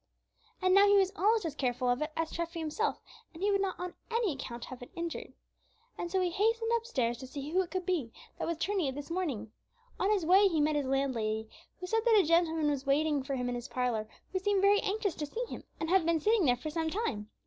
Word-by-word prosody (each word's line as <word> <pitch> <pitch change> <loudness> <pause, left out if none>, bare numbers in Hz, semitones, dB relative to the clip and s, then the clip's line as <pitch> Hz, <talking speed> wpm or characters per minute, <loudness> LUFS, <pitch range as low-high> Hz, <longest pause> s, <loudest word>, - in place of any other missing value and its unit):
And 370 0 +4
now 400 +1 +7
he 405 0 +6
was 385 -1 +3
almost 425 +1 +2
as 320 - -2
careful 250 -3 -1
of 245 +2 +1
it 305 +1 -2
as 325 -1 -1
Treffy 335 0 -4
himself, 325 +8 -2 0.3
and 340 - -7
he 410 - +3
would 395 -1 +2
not 385 -2 -2
on 360 0 -4 0.2
any 460 -6 +1
account 240 -3 -6
have 255 -1 -9
it 245 - -9
injured. 335 -1 -4 0.6
And 345 - -4
so 380 +2 +1
he 360 -1 +1
hastened 450 +4 +1
upstairs 260 - -1
to 260 - -8
see 280 +3 -6
who 370 +2 +3
it 360 - -5
could 370 0 -3
be 320 -11 -1 0.3
that - - -2
was 335 -1 -1
turning 380 -2 0
it 265 - -3
this 290 +3 -7
morning. 275 - -2 0.5
On 390 - +2
his 405 -6 +2
way 385 +4 +6
he 330 -5 0
met 300 +1 +2
his 285 -2 0
landlady, 230 -5 0 0.3
who 365 - -5
said 450 +4 +1
that 450 -3 +6
a - - +5
gentleman 325 -2 +3
was 275 -1 -3
waiting 295 +1 +2
for 270 +1 -3
him 250 -1 -2
in 245 - -1
his 240 0 -5
parlor, 235 -4 -1 0.2
who 375 - +1
seemed 395 0 +1
very 405 +1 +6
anxious 405 -2 -1
to 300 - -4
see 460 +11 -3
him, - - -8
and 320 +1 -2
had 380 -2 +5
been 330 0 +2
sitting 425 +2 +3
there 245 -2 +3
for 305 +5 -5
some 320 0 -1
time. 265 - -3
330 Hz, 250 wpm, -31 LUFS, 270-390 Hz, 0.6 s, now